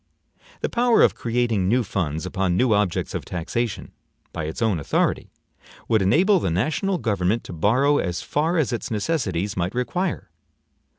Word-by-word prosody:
The - - 0
power 240 -1 +3
of - - +4
creating 115 -5 0
new 125 +3 +3
funds 85 -5 -3
upon 90 -1 0
new 125 -1 +3
objects 105 -4 0
of - - -3
taxation, 100 +6 -3 0.4
by 80 - -3
its 80 - -5
own 110 -7 +1
authority, 70 - 0 0.6
would 110 -2 +3
enable 180 - +4
the 95 - -1
national 155 - 0
government 105 - 0
to - - -9
borrow 130 - +2
as 90 -1 -2
far 160 +4 0
as 140 -6 +1
its 120 - -3
necessities 105 - -1
might 90 +4 -2
require. 175 +8 -2
110 Hz, 160 wpm, -23 LUFS, 90-145 Hz, 0.6 s, of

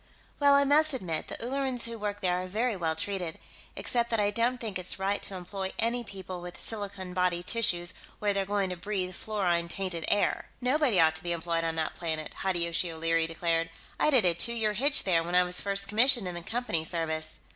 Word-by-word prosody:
"Well, 285 -1 +5
I 280 - +5
must 300 +2 +3
admit, 180 -11 -2
the - - -5
Ullerans 260 0 -2
who 230 -1 -6
work 205 0 -4
there 180 -1 +1
are 185 - -6
very 220 +4 -1
well 165 -3 -1
treated. 185 -3 -2 0.4
Except 235 -1 0
that 225 - 0
I 205 0 +2
don't 235 +4 +1
think 215 -6 -4
it's 180 - +1
right 195 +1 -1
to 195 - -4
employ 190 +1 -4
any 240 +1 0
people 190 -4 -8
with 175 0 -9
silicone 200 -4 -5
body 180 -1 0
tissues 180 -5 +2 0.2
where 205 -1 0
they're 195 0 0
going 195 -1 -1
to - - -3
breathe 185 0 -3
fluorine 180 -4 -1
tainted 180 -4 -3
air." 205 - +1
"Nobody 255 - +2
ought 160 -1 +5
to - - -10
be 175 0 -1
employed 165 0 -1
on 165 0 -1
that 160 -1 -1
planet!" 160 -2 -4
Hideyoshi 175 -2 0
O'Leary 165 0 +1
declared. 165 0 0 0.3
"I - - +3
did 255 -9 +4
a 175 - +4
two 235 +8 +2
year 220 -2 +1
hitch 285 +7 +5
there, 175 -4 +2
when 175 +2 -3
I 180 - +7
was 180 0 0
first 200 0 0
commissioned 230 0 +5
in 180 - -4
the 175 - -5
Company 225 -4 -2
service." 160 -1 -3
190 Hz, 215 wpm, -29 LUFS, 170-225 Hz, 0.4 s, I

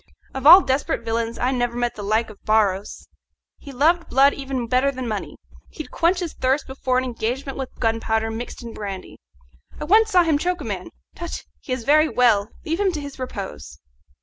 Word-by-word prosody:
Of 265 +1 0
all 360 +5 +11
desperate 270 -3 -1
villains 230 0 -2
I 250 +2 0
never 245 -2 -1
met 240 0 0
the 210 - -8
like 215 +2 0
of 205 - -18
Barros. 205 -2 0 0.5
He 280 - -10
loved 325 +6 +2
blood 275 +2 +5
even 270 -3 -4
better 255 +4 +2
than 255 -2 -5
money. 215 -3 -4 0.3
He'd 310 - -9
quench 350 +2 +1
his 340 -3 -4
thirst 265 +3 0
before 260 -1 -1
an 255 - +1
engagement 255 +3 -3
with 265 -1 -5
gunpowder 225 -1 0
mixed 235 +2 -7
in 230 -1 -8
brandy. 195 -3 -7 0.6
I - - -4
once 435 +7 +4
saw 360 -4 +5
him 315 -3 +1
choke 360 +2 -1
a - - -5
man - - -5 0.2
tut! 345 -1 -6 0.2
he - - -10
is 255 -2 -2
very 305 +5 +4
well 220 -4 +3 0.2
leave 330 +2 -2
him 400 -2 +2
to 305 - -3
his 285 -2 -8
repose." 190 - -7
255 Hz, 200 wpm, -22 LUFS, 225-295 Hz, 0.6 s, all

